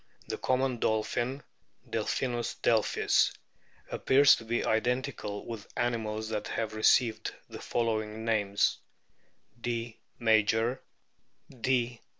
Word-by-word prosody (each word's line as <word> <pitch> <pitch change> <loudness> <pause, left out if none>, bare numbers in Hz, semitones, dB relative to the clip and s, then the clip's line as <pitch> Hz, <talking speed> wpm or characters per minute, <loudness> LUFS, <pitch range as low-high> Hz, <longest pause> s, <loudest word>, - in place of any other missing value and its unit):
The - - -3
Common 130 -1 0
Dolphin, 120 +5 -1 0.4
Delphinus 120 -2 -2
delphis, 110 -2 +3 0.6
appears 140 +2 +5
to - - -9
be 120 +1 -1
identical 110 -3 -1
with 115 -3 -7
animals 110 -2 -1
that 110 -2 -3
have 110 -1 -3
received 110 +1 +2
the - - -9
following 110 -1 -2
names: 105 -3 +1 0.8
D. 115 -1 -3 0.2
major, 110 +2 +2 0.7
D. 125 -2 -1
115 Hz, 100 wpm, -30 LUFS, 110-120 Hz, 0.8 s, appears